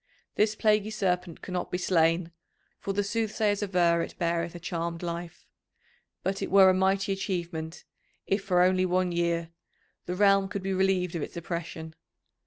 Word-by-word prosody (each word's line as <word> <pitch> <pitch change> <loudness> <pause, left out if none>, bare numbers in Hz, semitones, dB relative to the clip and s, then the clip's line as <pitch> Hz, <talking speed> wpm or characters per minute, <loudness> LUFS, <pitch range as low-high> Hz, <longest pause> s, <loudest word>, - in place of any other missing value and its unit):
This 215 0 +2
plaguy 215 -1 +2
Serpent 180 -5 -2
cannot 180 -1 -3
be 180 - -2
slain, 165 -1 +2 0.5
for 200 - -3
the 205 +1 0
soothsayers 210 -1 0
aver 175 -4 +2
it - - -6
beareth 170 0 -1
a - - -7
charmed 170 0 -4
life, 170 0 -6 0.8
but 195 +1 -2
it - - -2
were 190 0 +7
a - - +2
mighty 195 +1 +1
achievement, 170 -4 -4 0.4
if 195 +1 0
for 180 -3 +3
only 185 0 +3
one 180 0 +1
year, 170 -1 -1 0.6
the 180 - -2
realm 195 0 +4
could 200 -1 -5
be 195 0 -1
relieved 185 -2 +1
of 170 - -3
its - - -6
oppression. 165 -1 -5
180 Hz, 165 wpm, -28 LUFS, 170-195 Hz, 0.8 s, were